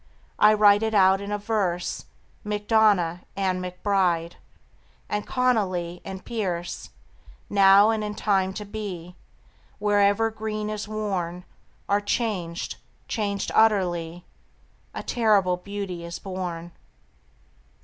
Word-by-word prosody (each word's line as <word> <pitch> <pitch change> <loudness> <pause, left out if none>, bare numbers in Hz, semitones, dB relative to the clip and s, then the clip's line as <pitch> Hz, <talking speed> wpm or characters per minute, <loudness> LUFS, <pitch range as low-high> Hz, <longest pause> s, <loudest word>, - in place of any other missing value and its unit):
I 215 0 +6
write 205 -1 +6
it 220 -1 -1
out 190 0 +5
in 200 +1 -6
a 210 - 0
verse 200 -5 -2 0.4
MacDonagh 210 -5 +2 0.2
and 190 -2 0
MacBride 180 -2 0 0.7
And 210 0 -3
Connolly 185 -9 0
and 190 -1 -8
Pearse 180 -7 -4 0.6
Now 200 +2 +6
and 220 -1 -1
in 210 0 -4
time 195 -3 +1
to 210 - -5
be, 195 -5 -7 0.6
Wherever 205 +1 +2
green 215 -1 -4
is 210 0 -4
worn, 190 -5 -3 0.4
Are 205 +1 +2
changed, 205 -6 -2 0.3
changed 200 -3 -2
utterly: 175 -5 +2 0.7
A - - -4
terrible 205 -6 +2
beauty 195 -2 -6
is 170 0 -6
born. 180 -3 -5
200 Hz, 110 wpm, -25 LUFS, 180-210 Hz, 0.7 s, I